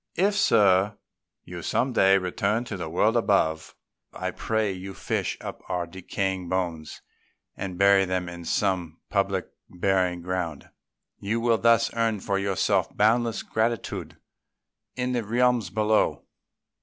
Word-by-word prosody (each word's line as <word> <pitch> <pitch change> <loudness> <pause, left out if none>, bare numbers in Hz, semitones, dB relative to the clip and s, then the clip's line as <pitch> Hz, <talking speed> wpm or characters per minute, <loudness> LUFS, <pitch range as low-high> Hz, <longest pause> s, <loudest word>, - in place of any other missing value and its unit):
If, 195 +4 +2
Sir, 105 - +3 0.5
you - - -8
some 130 0 0
day 95 -3 +5
return 100 +5 -1
to 115 - -6
the 85 -4 -5
world 105 +7 +2
above, 80 -9 +1 0.4
I - - -4
pray 110 -2 -1
you 95 +1 -7
fish - - -2
up - - -7
our 90 -1 -1
decaying 95 +1 -3
bones 85 -4 -3 0.5
and 95 -2 -5
bury 100 0 +5
them 90 -1 -2
in 85 0 -8
some 85 -4 -1
public 100 -2 0 0.2
burying 90 -1 0
ground. 90 -4 -3 0.5
You 110 +4 -1
will 115 -1 +2
thus 115 0 +3
earn 115 -2 0
for 100 +1 -1
yourself 100 0 +1
boundless 115 +2 +2
gratitude 115 0 -2 0.8
in 125 0 -1
the 120 -2 -1
realms 120 -2 +1
below." 110 +2 +1
100 Hz, 135 wpm, -26 LUFS, 90-115 Hz, 0.8 s, day